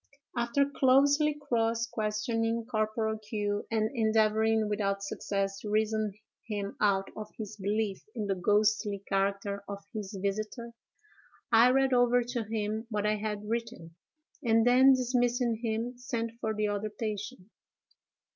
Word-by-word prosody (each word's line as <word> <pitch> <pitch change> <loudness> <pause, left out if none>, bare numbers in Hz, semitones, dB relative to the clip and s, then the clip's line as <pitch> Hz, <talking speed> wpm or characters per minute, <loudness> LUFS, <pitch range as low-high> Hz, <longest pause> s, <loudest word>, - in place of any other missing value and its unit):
"After 240 +4 +2
closely 285 +2 +4
cross 230 -4 0
questioning 225 +1 -1
Corporal 220 -1 -1
Q——, 210 -1 -3
and 220 0 0
endeavoring 220 -1 +2
without 200 -1 -1
success 195 0 -2
to 210 - -6
reason 215 -1 +1 0.3
him 205 -2 -3
out 195 -2 +2
of 215 -1 -7
his 215 -1 -6
belief 205 0 -1
in 215 -3 -2
the 200 - +1
ghostly 205 +1 +1
character 200 +1 -1
of 200 0 -6
his 210 -2 -5
visiter, 215 +4 -3 0.8
I 230 +2 +7
read 265 0 +3
over 245 0 +4
to 240 -1 -3
him 220 +1 -3
what 210 -2 -1
I 215 0 +2
had 210 0 -4
written, 230 -7 -4 0.5
and 225 -1 +3
then, 260 +2 +7
dismissing 245 -2 +1
him, 230 +2 -2
sent 230 -2 -3
for 220 0 -1
the 210 0 0
other 205 +1 -2
patient. 210 0 -5
220 Hz, 135 wpm, -30 LUFS, 205-235 Hz, 0.8 s, I